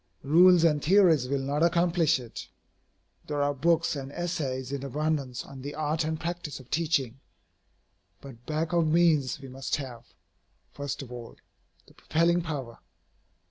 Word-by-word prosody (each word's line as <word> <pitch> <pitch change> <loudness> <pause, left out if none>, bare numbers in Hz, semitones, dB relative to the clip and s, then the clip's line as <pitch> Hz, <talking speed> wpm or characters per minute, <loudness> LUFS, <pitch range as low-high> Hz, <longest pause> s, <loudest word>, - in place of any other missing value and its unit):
Rules 175 +4 +6
and 150 -3 +3
theories 170 -7 +4
will 140 -1 -1
not 145 +3 -1
accomplish 170 -2 +3
it. 120 -2 -9 0.8
There 145 -1 -1
are 145 0 +1
books 165 +4 +1
and 135 -1 -6
essays 140 -7 -3
in 140 -1 -4
abundance 140 -2 -2
on 135 -1 -11
the 145 +2 -6
art 155 +1 -1
and 160 0 -2
practice 170 -3 -5
of 130 -1 -16
teaching. 140 -6 0 1.0
But 125 -4 -12
back 155 +2 -2
of 170 -2 +3
means 155 -5 +2
we 135 - -10
must 130 +1 -3
have, 125 -4 -8 0.6
first 140 -1 -5
of 125 - -12
all, 120 -2 -9 0.5
the - - -21
propelling 170 +2 +1
power. 140 -8 -6
150 Hz, 150 wpm, -28 LUFS, 135-165 Hz, 1.0 s, Rules